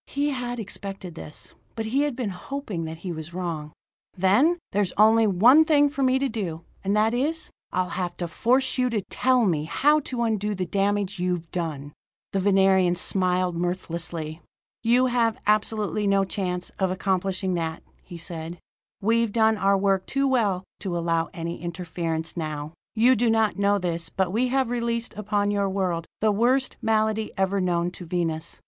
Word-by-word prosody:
He 290 +1 -1
had 245 -2 -3
expected 195 -3 -5
this; 155 -2 -9 0.2
but 225 - -3
he 255 +6 +1
had 290 -3 0
been 235 -5 -2
hoping 195 - -5
that 160 0 -6
he 180 - -2
was 160 +1 -7
wrong. 165 -5 -4 0.5
"Then 210 - +4
there's 200 -2 0
only 220 +1 +6
one 235 - +6
thing 290 -2 +4
for 280 - -4
me 260 0 +3
to 275 +1 +1
do, 185 -9 -4 0.2
and 200 +2 +1
that 220 +2 +3
is: 305 +6 -1 0.2
I'll 185 0 0
have 180 -1 -3
to 175 - -3
force 255 +10 +1
you 250 0 +3
to 215 -4 -1
tell 255 -2 +3
me 155 -6 +1
how 295 - +3
to 250 -4 -3
undo 210 -2 0
the 185 -1 -2
damage 200 +1 0
you've 175 -2 -2
done." 150 -5 -4 0.4
The 195 - +1
Venerian 190 -2 +4
smiled 180 -1 0
mirthlessly. 170 -2 -4 0.4
"You 240 +3 +4
have 235 -3 +1
absolutely 210 -1 +1
no 195 0 +3
chance 180 -2 -3
of 190 -1 +2
accomplishing 190 0 -1
that," 165 -2 -3 0.2
he 175 - -10
said. 165 0 -6 0.5
"We've 230 +1 +2
done 220 0 +3
our 195 0 +3
work 195 -1 +1
too 275 0 +1
well 210 -8 +1 0.2
to 180 -4 -3
allow 165 -1 0
any 170 -1 -5
interference 165 -2 -4
now. 155 -2 -4 0.2
"You 240 +4 +5
do 235 +1 +2
not 220 -2 +2
know 200 0 +3
this, 170 -3 -2
but 190 0 -1
we 245 +4 +2
have 260 -1 +1
released 235 -1 -1
upon 205 -1 0
your 200 -1 +1
world 180 -4 -1
the 215 0 +4
worst 250 +6 +2
malady 220 -1 +1
ever 195 +1 +1
known 175 -1 0
to 180 - -10
Venus. 165 -1 -2
195 Hz, 175 wpm, -25 LUFS, 175-230 Hz, 0.5 s, only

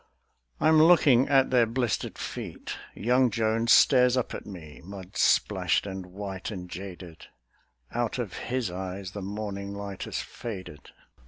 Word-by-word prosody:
III - - +2
I'm 155 0 +6
looking 145 -7 +5
at 135 -2 +4
their 120 -3 +4
blistered 120 -2 -2
feet; - - -6 0.2
young 125 +3 +3
Jones 115 +1 +1
Stares 125 -2 +6
up 125 - -1
at - - -7
me, 80 -7 -10
mud 95 0 -10
splashed - - +2
and 95 -2 -6
white 95 0 -6
and 90 -4 -6
jaded; 90 -2 -9 0.6
Out 120 0 -1
of 115 -7 -4
his 120 -2 -3
eyes 95 +1 -5
the 100 - -6
morning 100 0 -5
light 100 -1 -6
has - - -4
faded. 95 -10 -8
100 Hz, 150 wpm, -27 LUFS, 95-120 Hz, 0.6 s, I'm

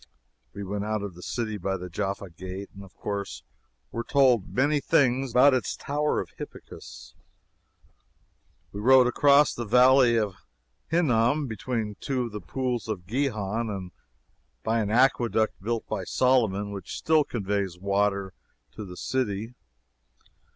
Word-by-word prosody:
We 100 - -5
went 100 +1 -3
out 110 -1 -2
of 100 -3 -5
the 90 - -13
city 110 0 -3
by 95 +1 -2
the 90 0 -7
Jaffa 100 +1 -4
gate, 95 +3 -8
and 100 - -11
of 95 - -16
course 100 -1 -5 0.5
were 115 - -3
told 125 -8 +3
many 145 +3 +2
things 130 -1 +2
about 130 +4 +5
its 130 - -1
Tower 150 +1 -1
of - - -5
Hippicus. - - -10 1.6
We 100 - -7
rode 130 +3 +6
across 140 +4 +4
the 120 - -4
Valley 125 +1 +5
of 105 -3 0 0.5
Hinnom, 145 -3 +2
between 110 -2 -4
two 130 -2 -1
of 120 - -5
the 105 0 -6
Pools 125 +5 -3
of 100 -5 -4
Gihon, 115 -2 -1
and 95 -3 -5 0.7
by 115 +1 +1
an 105 -2 -1
aqueduct 120 -3 +2
built 115 +2 -2
by - - -3
Solomon, 110 -6 +1
which 100 -3 -6
still 160 -1 +3
conveys 100 -7 -2
water 100 0 0 0.4
to 110 - -8
the 90 -2 -9
city. 115 -3 -2
110 Hz, 145 wpm, -26 LUFS, 100-130 Hz, 1.6 s, rode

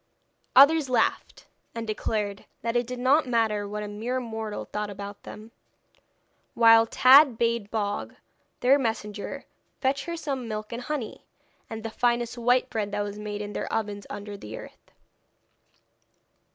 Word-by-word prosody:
Others 285 +1 +7
laughed, 240 -3 0 0.3
and 230 0 -4
declared 210 -2 -3 0.2
that 230 +1 -1
it 240 -1 +1
did 250 0 -5
not 265 +4 +3
matter 220 -4 +1
what 210 +1 -4
a - - -5
mere 225 +5 -3
mortal 220 -3 -5
thought 210 0 -4
about 200 0 -8
them; 215 +2 -11 1.0
while 225 -1 +7
Tad 260 +1 +7
bade 230 -3 0
Bog, 205 -2 -3 0.5
their 270 +3 +5
messenger, 215 -4 -4 0.3
fetch 270 0 0
her 340 0 -4
some 275 -6 -4
milk 215 0 -5
and 235 - -4
honey, 265 -4 -5 0.5
and 225 -1 -6
the 225 - -4
finest 240 0 0
white 245 +1 +2
bread 210 -4 -3
that 205 - 0
was 205 0 -6
made 210 0 -5
in 205 0 -7
their - - -4
ovens 205 -2 -3
under 205 0 -7
the 110 - -8
earth. - - -13
225 Hz, 150 wpm, -26 LUFS, 210-250 Hz, 1.0 s, Others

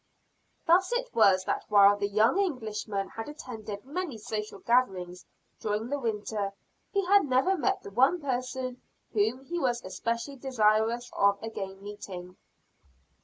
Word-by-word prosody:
Thus 365 +4 +4
it - - -2
was 190 -4 +5
that - - -2
while 205 -1 +7
the 200 0 -1
young 215 - +3
Englishman 215 - -2
had 225 +4 -6
attended 220 -8 -7
many 300 -2 -4
social 215 -1 -5
gatherings 190 -7 0 0.3
during 215 +2 -2
the 285 +1 -1
winter 210 -4 -2 0.4
he 395 -2 +1
had 400 0 +5
never 265 +8 +3
met 390 +3 0
the - - -9
one 265 - +4
person 255 -2 -3 0.3
whom 225 +5 +1
he 345 +4 -3
was 245 -5 0
especially 235 +8 -3
desirous 230 -2 +1
of 200 0 +3
again 195 -3 -6
meeting. 185 -3 -8
230 Hz, 140 wpm, -29 LUFS, 205-270 Hz, 0.4 s, while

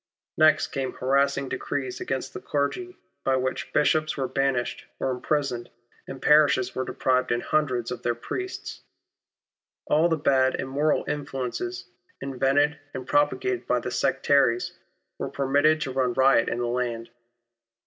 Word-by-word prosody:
Next 155 0 +5
came 135 -1 -3
harassing 140 +1 +1
decrees 130 0 -4
against 130 0 -3
the - - -7
clergy 360 - -2 0.3
by 135 - +2
which 130 0 -2
Bishops 155 +1 +2
were 135 -2 -1
banished 135 -3 -1
or 135 - 0
imprisoned 125 -1 -2 0.4
and 135 - -7
parishes 140 -4 +4
were 130 - -2
deprived 130 -1 0
in 120 - +1
hundreds 130 -7 0
of 125 -1 -5
their 120 -1 0
priests. 370 - -6 1.0
All 160 +3 +3
the 165 - +1
bad, 130 -3 +3
immoral 140 +3 0
influences, 145 - -4 0.3
invented 140 +3 +1 0.2
and 130 -1 -5
propagated 130 -4 +1
by 125 - +2
the 125 - -5
sectaries, 130 -1 +2 0.4
were - - -3
permitted 145 +3 +2
to 135 - -2
run 130 -2 0
riot 130 -2 +4
in 120 - -2
the 120 - -1
land. 120 -1 -2
135 Hz, 140 wpm, -26 LUFS, 125-145 Hz, 1.0 s, Next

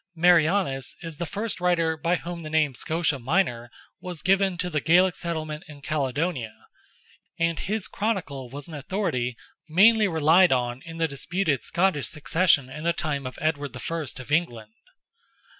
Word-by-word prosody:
Marianus 165 - +3
is 165 -3 -7
the 170 - -2
first 205 +3 -3
writer 170 -2 +2
by 165 +2 0
whom 170 0 -6
the 155 - -7
name 155 -3 +2
Scotia 160 +2 -1
Minor 125 -4 0 0.3
was 180 -3 -7
given 195 -1 +2
to 180 +1 -1
the 155 -4 -1
Gaelic 180 +3 +4
settlement 155 -3 -4
in 145 -2 -13
Caledonia, 140 -4 -2 0.8
and 165 -1 0
his 210 +1 -3
chronicle 170 - -3
was 140 +2 -8
an 165 - -10
authority 145 - -2 0.3
mainly 210 +6 +6
relied 165 +2 +5
on 125 -1 0
in 165 0 -8
the 165 0 +1
disputed 155 - -1
Scottish 170 -8 +1
succession 155 -2 +2
in 150 +4 -8
the 170 0 +2
time 140 -6 -3
of 130 - -8
Edward 145 -4 -2
I. 165 +2 -4
of 130 +3 -10
England. 120 -10 -1
160 Hz, 160 wpm, -25 LUFS, 140-180 Hz, 0.8 s, mainly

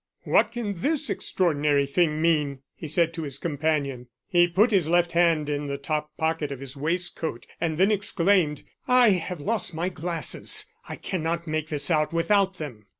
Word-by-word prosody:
"What - - +3
can 230 -4 -3
this 300 - 0
extraordinary 150 -5 +1
thing 155 +1 +1
mean?" 145 -5 +1
he 160 - -8
said 165 +2 +1
to 165 - -5
his 140 -3 -4
companion. 145 -5 -2 0.2
He 175 -2 +4
put 200 +7 +3
his 180 -6 +2
left 175 0 +3
hand 170 -3 +2
in 145 0 -2
the 140 0 -3
top 150 +1 -3
pocket 160 -2 -1
of 135 - -6
his 135 0 -8
waistcoat, 160 -3 -2 0.2
and 160 -2 -1
then 190 +4 +4
exclaimed: 180 -6 +1 0.2
"I 250 -2 +5
have 180 -2 -2
lost 195 +1 -1
my 170 +3 -1
glasses; 165 -4 +1 0.2
I - - -4
cannot 170 -2 -3
make 155 -1 -2
this 150 +3 0
out 155 0 +1
without 190 +3 +2
them." 125 -10 -8
165 Hz, 175 wpm, -25 LUFS, 150-180 Hz, 0.2 s, I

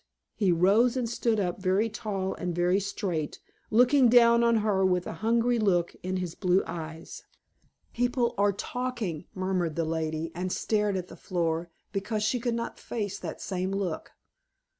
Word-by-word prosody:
He 200 -5 +2
rose 205 +9 +4
and 245 -2 0
stood 230 -1 0
up, 180 -1 -2
very 190 +4 +2
tall 205 -4 -3
and 175 -1 -4
very 175 +2 +2
straight, 185 -6 -3 0.3
looking 250 +3 +5
down 235 0 +6
on 235 0 +4
her 195 -3 +2
with 180 -1 +2
a - - -5
hungry 235 +2 +2
look 175 -5 +1
in 185 +1 -2
his 180 -3 -3
blue 185 0 +2
eyes. 160 -1 -7 0.7
"People 245 0 +1
are 200 0 +3
talking," 215 -6 -4
murmured 185 -4 -1
the 165 - 0
lady, 160 0 -2
and 180 +2 -3
stared 210 -1 0
at 180 -1 -4
the - - -11
floor, 170 -2 -2 0.2
because 210 +2 -2
she 245 +3 +1
could 240 -1 -1
not 235 0 -4
face 205 -4 -4
that - - -6
same 185 -1 -2
look. 195 -4 -3
195 Hz, 165 wpm, -28 LUFS, 175-230 Hz, 0.7 s, down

